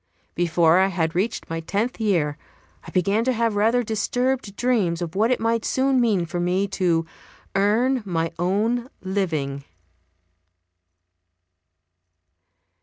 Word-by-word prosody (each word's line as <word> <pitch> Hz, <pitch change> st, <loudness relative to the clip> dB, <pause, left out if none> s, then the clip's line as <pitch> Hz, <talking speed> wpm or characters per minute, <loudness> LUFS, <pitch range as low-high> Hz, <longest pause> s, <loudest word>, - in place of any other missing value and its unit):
Before 170 Hz, 0 st, +3 dB
I 190 Hz, -, +4 dB
had 165 Hz, -4 st, -1 dB
reached 200 Hz, +6 st, -2 dB
my 165 Hz, 0 st, -3 dB
tenth 205 Hz, +10 st, -2 dB
year 170 Hz, -9 st, +1 dB, 0.5 s
I -, -, -9 dB
began 200 Hz, +4 st, +1 dB
to 260 Hz, -, +2 dB
have 230 Hz, -2 st, 0 dB
rather 225 Hz, +4 st, +2 dB
disturbed 240 Hz, +1 st, -1 dB
dreams 205 Hz, -9 st, +1 dB
of 170 Hz, -2 st, -4 dB
what 215 Hz, +4 st, +2 dB
it 255 Hz, -, +1 dB
might 230 Hz, 0 st, 0 dB
soon 265 Hz, -1 st, +2 dB
mean 205 Hz, -7 st, +2 dB
for 175 Hz, +1 st, -4 dB
me 180 Hz, +3 st, +1 dB
to 170 Hz, -4 st, +1 dB, 0.5 s
"earn 230 Hz, +6 st, +2 dB
my 165 Hz, -4 st, -2 dB
own 220 Hz, +7 st, 0 dB
living." 160 Hz, -8 st, -2 dB
200 Hz, 125 wpm, -23 LUFS, 175-230 Hz, 0.5 s, I